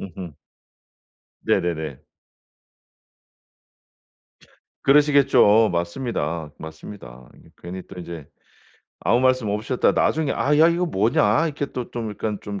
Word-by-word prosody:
음음. 90 -4 -8 1.1
네네네. 80 -7 -1 2.8
그러시겠죠. 140 -7 +5
맞습니다. 85 - -3
맞습니다. 80 -6 -11 0.3
괜히 90 +2 -7
또 95 - -11
이제 85 -4 -8 0.7
아무 120 +2 +2
말씀 130 -4 +2
없으셨다가 110 +5 0
나중에 155 -3 +1
"아 145 +1 +1
야 160 +2 +7
이거 175 +1 0
뭐냐." 110 - +2
이렇게 145 -2 -3
또 125 -2 -5
좀 115 -3 -4
약간 105 0 -4
좀 100 -1 -6
105 Hz, 235 characters per minute, -22 LUFS, 85-130 Hz, 2.8 s, 야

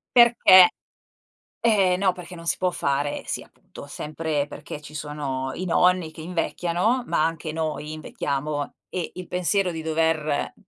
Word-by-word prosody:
Perché 230 -7 +8 0.9
eh 200 -6 +4
no, 190 -1 +2
perché 180 0 -10
non 170 -1 -10
si - - 0
può 185 -1 +1
fare. 140 -2 -1
Sì, - - -3
appunto, - - -14
sempre 150 0 -3
perché 150 - -8
ci 150 0 -12
sono 145 -3 -4
i 185 - -4
nonni 180 -1 +2
che 160 - -11
invecchiano, 180 +7 0
ma 155 - +2
anche 160 -1 -3
noi 155 -1 -3
invecchiamo 145 -1 -3 0.2
e 180 -3 -4
il 180 0 -7
pensiero 180 +1 +1
di 160 -1 -5
dover 160 -2 0
165 Hz, 150 wpm, -24 LUFS, 150-180 Hz, 0.9 s, Perché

